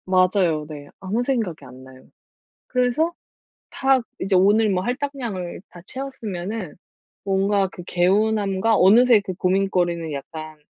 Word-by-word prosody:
맞아요. 185 -4 +2
네. 145 -2 -9
아무 205 +6 -2
생각이 225 - -2
안 130 0 -13
나요. 130 0 -15 0.6
그래서 255 +7 +1 0.6
다 270 0 +2 0.2
이제 190 +1 0
오늘 205 +4 +4
뭐 185 -2 0
할당량을 245 -9 -4
다 175 - -13
채웠으면은 220 -7 -6 0.5
뭔가 195 0 +1
그 180 - -10
개운함과 200 +3 +1
어느새 230 +5 +6
그 195 -2 -6
고민거리는 180 -3 0
약간 155 +2 -8
195 Hz, 275 characters per minute, -22 LUFS, 175-225 Hz, 0.6 s, 어느새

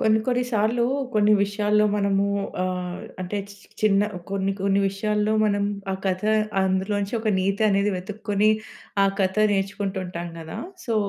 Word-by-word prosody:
కొన్ని 220 0 +4
కొన్ని 250 -1 +2
సార్లు 225 +3 +2 0.3
కొన్ని 210 0 +4
విషయాల్లో 210 +1 +2
మనము 200 -1 +2 0.4
ఆహ్, 180 -1 -3 0.2
అంటే 185 +3 -3 0.4
చిన్న 200 -2 +4 0.3
కొన్ని 195 0 0
కొన్ని 195 0 +2
విషయాల్లో 210 +2 0
మనం 205 -1 +1 0.3
ఆ - - 0
కథ 185 -1 0 0.4
అందులో 190 +2 0
నుంచి 200 +3 -3
ఒక 220 -1 0
నీతి 195 +3 0
అనేది 200 +1 +2
వెతుక్కొని 210 +2 0 0.5
ఆ - - +5
కథ 190 0 +1 0.2
నేర్చుకుంటూ 195 0 -1
ఉంటాం 175 -1 -5
గదా! 160 -1 -7 0.3
సో, 230 -3 -1
200 Hz, 145 wpm, -24 LUFS, 190-210 Hz, 0.5 s, ఆ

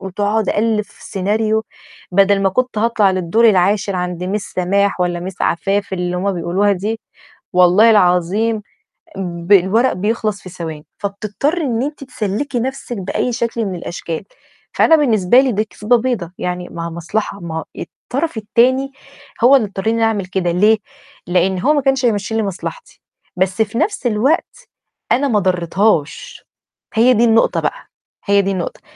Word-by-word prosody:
وتقعد 205 +3 -1
أألّف 215 -1 +1
سيناريو، 215 +3 -1 0.5
بدل 195 +1 +4
ما 195 - +4
كنت 250 +3 -1
هاطلع 220 -3 +2
للدور 185 +5 +2
العاشر 195 +1 +1
عند 180 0 -3
miss 210 - -4
سماح 195 +2 +1
والّا 175 0 -1
miss - - -16
عفاف 195 +3 0
اللي 180 -1 -2
هُم 195 +2 0
بيقولوها 185 +4 +1
دي، 210 +4 -3 0.5
والله 180 +5 +5
العظيم 205 +3 +2 0.6
ب 175 -1 -5
الورق 205 +6 +4
بيخلص 210 +2 -2
في 185 - -10
ثواني، 160 -4 -7
فبتضطرِّ 210 - -2
إن 245 -5 -1
أنتِ 290 0 -5
تسلّكي 245 +2 -3
نفسِك 260 -1 -4
بأي 195 +6 -2
شكل 235 -1 -2
من 190 -2 -3
الأشكال، 170 -1 -5 0.5
فأنا 325 - +5
بالنسبة 240 - +4
لي 265 -1 0
دي 215 -1 0
كذبة 220 +3 +1
بيضة، 225 -8 -2
يعني 180 0 -4
ما 165 0 -5
هي - - -5
مصلحة 200 +5 -3
ما 160 -3 -5
الطرف 280 +1 -4
التاني 255 +5 +2 0.5
هو 260 +3 +7
اللي 235 -6 +2
اضطرني 195 +2 -3
إن 230 - -1
أنا 225 - +3
أعمل 210 -4 -1
كده، 180 -1 -1
ليه؟ 210 +6 +4 0.5
لأن 185 +1 +1
هو 285 +11 +3
ما 290 - +1
كانش 270 -1 +1
هيمَشّي 220 -1 0
لي 225 - +1
مصلحتي، 205 - -7 0.4
بس 185 +3 0
في 220 +2 -7
نفس 350 - 0
الوقت 240 +9 0 0.4
أنا 280 +3 +3
ما 220 -6 +2
ضريتهاش، 185 - 0 0.5
هي 235 +3 +5
دي 230 0 +2
النقطة 225 -1 +3
بقى، - - -4 0.4
هي 200 0 +4
دي 195 - -1
النقطة. 185 -3 -4
205 Hz, 160 wpm, -17 LUFS, 185-230 Hz, 0.6 s, هو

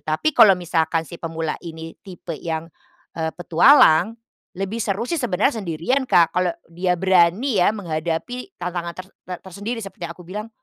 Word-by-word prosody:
tapi 155 - 0
kalau 195 -7 +7
misalkan 165 -2 0
si 170 - -10
pemula 165 -1 -3
ini 165 -1 -8
tipe 180 -3 -9
yang, 165 0 -4 0.5
eee, 160 -1 -1
petualang. 175 - +5 0.4
Lebih 195 +5 -3
seru 205 +4 -2
sih 340 - -2
sebenarnya 225 0 0
sendirian 170 - -1
Kak, 170 -1 +4
kalau 180 0 +2 0.2
dia 180 +2 -1
berani 190 +6 +3
ya - - +4
menghadapi 180 - -4
tantangan 175 -1 -4
ter 185 - -7 0.2
ter 180 -1 -5
tersendiri, 205 +6 -5
seperti 195 -5 -7
yang - - -7
aku 180 - -14
bilang 210 +5 -6
180 Hz, 165 wpm, -22 LUFS, 165-210 Hz, 0.5 s, kalau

